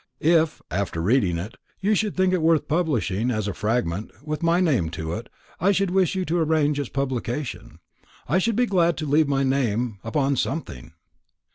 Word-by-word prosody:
If, 160 0 +3
after 90 -1 -2
reading 95 -2 +2
it, 100 +8 -6 0.2
you 205 +2 +2
should 210 -2 0
think 185 0 +3
it 180 - +1
worth 160 -2 +3
publishing, 130 - 0
as 110 -4 -1
a 100 - -2
fragment, 105 -3 -1 0.2
with 155 0 -3
my 170 +1 +3
name 135 - +2
to 80 0 -5
it, - - -6 0.3
I 190 +4 +3
should 195 -2 +1
wish 190 -1 +2
you 185 -1 -1
to 170 +1 0
arrange 150 -2 +2
its 140 - -3
publication. 135 0 -3 0.5
I 165 +9 +2
should 225 +3 0
be 245 +2 +3
glad 175 -6 +2
to 155 - -3
leave 150 +1 +3
my 135 -1 +1
name 125 -5 0
upon 135 +3 0
something." 80 - -4
145 Hz, 185 wpm, -24 LUFS, 110-170 Hz, 0.5 s, If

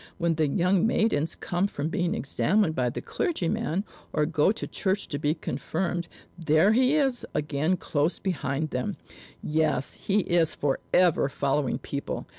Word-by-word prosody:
When 170 -2 +1
the 155 -1 +1
young 180 +7 +2
maidens 215 -10 +1
come 175 +3 -1
from 150 -5 -3
being 175 +3 0
examined 160 - +1
by 125 -4 0
the - - -6
clergyman, 185 - -1 0.3
or 150 - +1
go 155 +2 +3
to 220 - -4
church 195 0 -1
to 145 - -3
be 150 +1 +1
confirmed, 170 +5 -3 0.3
there 165 +5 +4
he 255 +5 +4
is 270 -5 +1
again 150 +4 0
close 155 +1 0
behind 155 -4 -2
them. 125 0 -2 0.5
Yes, 155 -4 0
he 205 +1 +2
is 170 -3 +1
forever 150 +2 +2
following 140 0 0
people. 140 0 -5
165 Hz, 150 wpm, -27 LUFS, 145-190 Hz, 0.5 s, there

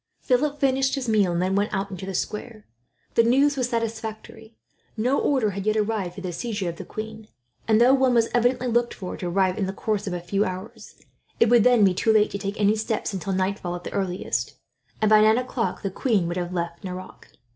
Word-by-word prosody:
Philip 285 +3 0
finished 270 -1 +2
his 265 -3 -4
meal, 210 -5 +3
and 170 - 0
then 185 +1 0
went 205 +2 +1
out 195 0 -2
into 190 0 -7
the 195 - -4
square. 215 +3 -4 0.5
The - - +5
news 275 +5 +3
was 255 -2 -1
satisfactory. 225 -1 -5 0.4
No 250 +6 +1
order 255 -7 +1
had 200 +1 -5
yet 215 0 +2
arrived 210 -4 -1
for 195 - -8
the 180 -2 -4
seizure 205 0 -3
of 170 - -7
the - - -8
queen; 220 0 -7 0.4
and 220 -1 +4
though 245 +3 +6
one 260 -2 +3
was 230 -1 +4
evidently 245 +1 +2
looked 240 0 +1
for, 185 -3 -6
to 180 - -4
arrive 185 +1 +1
in 195 - 0
the 190 - -3
course 210 0 -2
of 185 - -2
a 175 - -2
few 195 +4 0
hours, 185 +2 -7 0.4
it 230 - +5
would 240 -2 +6
then 245 -3 +5
be 190 -2 +5
too 220 +5 +2
late 215 -1 +3
to 200 - -4
take 200 +1 -4
any 205 +1 +3
steps 220 -1 -2
until 195 +1 -3
nightfall, 185 -1 -1
at 175 - -8
the - - -7
earliest; 180 -10 -2 0.4
and 215 - +2
by 215 0 +7
nine 220 +1 +5
o'clock 250 -3 -2
the 195 - -2
queen 200 -4 +1
would 175 +1 -3
have 175 0 -3
left 170 -1 -4
Nerac. 185 0 -9
215 Hz, 230 wpm, -24 LUFS, 190-235 Hz, 0.5 s, by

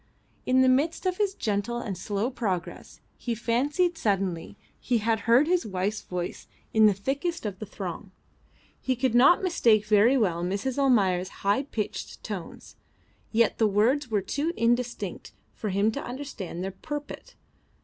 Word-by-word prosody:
In 255 +1 +4
the - - +4
midst 285 +9 +2
of 365 -1 0
his 405 -2 0
gentle 210 - -1
and 215 -5 -4
slow 205 +6 -2
progress 190 -9 -4 0.2
he 235 -2 -2
fancied 290 - 0
suddenly 195 -5 -1 0.2
he 245 - +1
had 225 0 +1
heard 245 +6 +6
his 355 +2 +2
wife's 200 +1 -2
voice 180 -1 -5 0.3
in 220 -1 +6
the 210 - +4
thickest 280 - -3
of 200 -3 -4
the 215 - -6
throng. 190 0 -6 0.7
He 260 - 0
could 255 0 0
not 275 +10 +6
mistake 230 - +3
very 215 +5 +5
well 175 -7 +1
Mrs. 200 +9 -2
Almayer's 195 -9 +3 0.2
high 200 +6 +3
pitched 230 -7 -5
tones, 195 -6 -7 0.5
yet 230 -1 +2
the 220 - +4
words 240 +7 +2
were 210 -3 +1
too 295 - -2
indistinct 235 -4 -1 0.2
for 215 - -4
him 200 +3 +2
to - - -5
understand 245 -9 -6
their 190 - -3
purport. 295 - -7
225 Hz, 160 wpm, -27 LUFS, 200-265 Hz, 0.7 s, heard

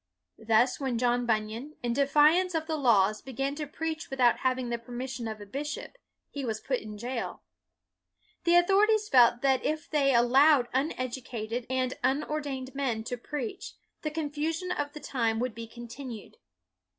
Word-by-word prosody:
Thus 230 +3 +3
when 260 -4 -1
John 245 0 +1
Bunyan, 225 +6 -2
in 240 -1 0
defiance 305 +7 +4
of 320 -1 0
the 320 -1 -2
laws, 215 -7 +3
began 270 +2 -3
to 300 0 -5
preach 320 +1 -4
without 250 -3 +3
having 255 -1 0
the 235 0 -2
permission 245 0 -5
of 220 -1 -5
a 205 - -9
bishop, 290 - -5 0.4
he 285 - -5
was 220 -3 -2
put 260 +1 -1
in 210 -1 -9
jail. 240 +2 -4 1.0
The 345 0 +4
authorities 415 +4 +4
felt 240 - +5
that 265 -1 +3
if 310 0 -2
they 280 -3 +2
al 240 -1 +4
lowed 270 0 +5
uneducated 250 -4 -3
and 255 0 0
unordained 270 -1 -1
men 255 -6 -1
to 245 - -3
preach, 370 - -5 0.3
the 305 - -2
confusion 315 +3 -2
of 290 -4 -2
the 300 - -7
time 230 -6 -1
would 245 0 -1
be 230 0 -7
continued. 235 0 -9
260 Hz, 165 wpm, -29 LUFS, 235-300 Hz, 1.0 s, felt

